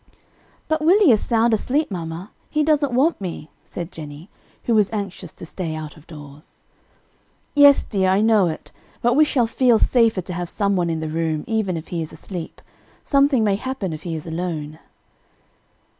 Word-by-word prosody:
"But 315 0 0
Willie 360 0 +5
is 215 - +3
sound 230 -1 +2
asleep, 270 +6 0
mamma, 170 +1 -6 0.2
he 300 0 +1
doesn't 295 -3 +2
want 270 +2 +2
me," 170 -4 -6
said 175 +1 -7
Jennie, 150 +3 -10 0.3
who 235 - 0
was 210 -3 +3
anxious 195 -5 -5
to - - -10
stay 165 -1 -5
out 155 -1 -7
of 155 -1 -18
doors. 150 -2 -13 0.9
"Yes, 285 -1 +7
dear, 190 -3 0
I 190 +2 +3
know 215 -4 +4
it, 160 - -6 0.3
but 240 +1 +3
we 300 +4 +5
shall 255 -5 +1
feel 240 0 +3
safer 230 -4 +3
to 180 +1 -6
have 175 0 -4
some 200 -1 0
one 175 -2 0
in 160 -1 -2
the 160 - -3
room, 160 -1 -2
even 215 -6 -1
if 160 - -8
he 170 -2 -3
is 155 - -6
asleep; 175 -4 -8 0.4
something 275 -4 +3
may 200 -2 +2
happen 235 -7 -4
if 155 - -7
he 165 -1 -4
is 155 - -6
alone." 160 -2 -4
195 Hz, 185 wpm, -21 LUFS, 165-240 Hz, 0.9 s, Yes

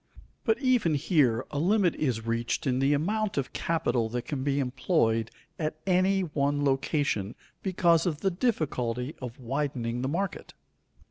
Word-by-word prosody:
But 450 - +2
even 245 - +2
here 135 - +2
a 145 - -2
limit 185 +1 +3
is 120 -7 -1
reached 115 +7 -1
in 130 -1 +1
the 135 +1 +3
amount 210 +7 -1
of 135 - -2
capital 125 -8 0
that 120 +1 -3
can 140 -3 -4
be 140 0 +1
employed 125 - +1 0.3
at 155 -1 -1
any 190 +1 +3
one 145 -3 0
location 135 - 0 0.3
because 170 -3 +3
of 155 -3 -2
the 195 - +2
difficulty 145 - -1
of 125 -1 -7
widening 125 -2 -2
the 130 - -1
market. 185 +4 -3
145 Hz, 150 wpm, -28 LUFS, 125-175 Hz, 0.3 s, limit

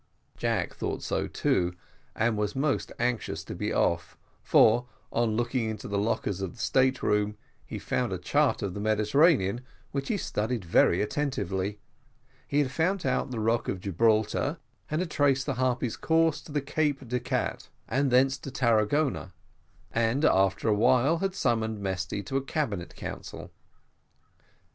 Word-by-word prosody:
Jack - - -1
thought - - -4
so - - -1
too, 90 0 0 0.4
and 110 0 +1
was 105 +2 -1
most 140 +1 0
anxious 120 -2 -1
to - - -7
be - - -3
off, 85 -1 0 0.2
for, 120 +3 +4 0.3
on 115 -2 +1
looking 120 -1 0
into 110 -2 -5
the 100 0 -1
lockers 100 -2 -1
in 95 -2 -4
the - - -18
state 130 +2 +2
room, 105 0 +1 0.3
he - - -6
had - - -6
found - - -1
a - - -1
chart - - +1
of 95 -3 -2
the 100 - -5
Mediterranean, 110 - +3 0.3
which 140 0 -3
he - - 0
had 200 - -3
studied 110 -1 -2
very 85 +2 +4
attentively 105 -7 -2 0.7
he 145 - -1
had 130 - -4
found 175 +6 0
out 130 +1 0
the 120 -3 -4
rock 115 +1 +1
of 95 - -2
Gibraltar, 110 - +1 0.3
and 155 +3 0
had 175 -4 -4
traced 140 -2 +2
the 140 - -1
Harpy's 125 -2 0
course 160 -2 +2
up 150 - -9
to 145 - +2
Cape 145 -2 -1
de 125 +2 -1
Gatte, 125 +1 -2 0.2
and 140 +1 +1
thence 130 +1 +3
to - - -7
Tarragona 120 - +1 0.6
and, 115 +6 +1
after 95 +3 +3
a 110 - +4
while, 130 +9 +3
had 195 0 -1
summoned 110 - 0
Mesty 95 +1 -3
to 135 +8 -2
a - - 0
cabinet 120 - -3
council. - - -7
120 Hz, 165 wpm, -28 LUFS, 105-140 Hz, 0.7 s, for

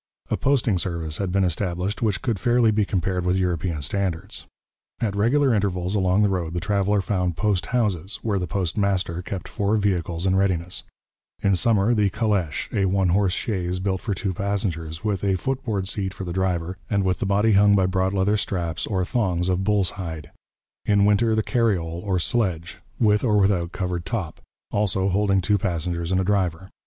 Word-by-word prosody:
' - - -39
A - - +3
posting 120 -8 +1
service 85 -4 -3
had 95 -3 -2
been 95 +1 +2
established 90 +2 -1
which 105 -2 0
could 115 -8 -1
fairly 120 +2 +3
be 105 -1 +1
compared 95 -1 -1
with 90 +1 +1
European 85 -4 -1
standards. 95 +3 -3 0.5
At 105 -4 -1
regular 130 +6 +3
intervals 95 -3 0
along 95 0 +2
the 105 - +3
road 85 -3 -2
the - - 0
traveller 100 +2 +1
found 90 -3 -1
post 100 -2 0
houses, 105 -5 0
where 105 -4 0
the 90 - -3
post 95 +3 -2
master 95 -4 0
kept 90 +1 -6
four 100 +2 0
vehicles 90 -4 -1
in 95 0 +2
readiness: 90 -3 0 0.6
in 100 -1 +3
summer 110 +3 +2
the 105 -3 +2
calèche, 95 -7 -1
a 100 - +2
one 95 -1 +2
horse 95 0 +2
chaise 90 -4 -2
built 95 -1 -1
for 105 -4 -2
two 95 0 -2
passengers, 85 -5 -3
with 105 -3 -1
a 95 -1 +2
footboard 110 -4 -2
seat 95 -1 -2
for 95 - -6
the 85 -2 -4
driver 90 -1 -1
and 100 -2 +1
with 90 -2 0
the - - -1
body 100 +3 +3
hung 100 0 +5
by 95 -2 +3
broad 95 0 +1
leather 100 +2 +2
straps 85 -5 -2
or 95 -3 0
thongs 90 -6 0
of 95 +1 0
bull's 100 -2 +2
hide; 80 -6 -7 0.5
in 100 -1 +3
winter 110 +2 +3
the 110 - +1
carriole, 90 -10 0
or 95 -3 0
sledge, 90 -3 -1 0.2
with 105 -2 +3
or 105 -4 +3
without 95 -4 +2
covered 90 -1 -3
top, 95 -6 -4 0.3
also 100 -2 +1
holding 100 0 +2
two 100 +2 +2
passengers 85 -1 -2
and 95 - +2
a - - +1
driver. 95 -2 0
95 Hz, 190 wpm, -23 LUFS, 90-105 Hz, 0.6 s, hung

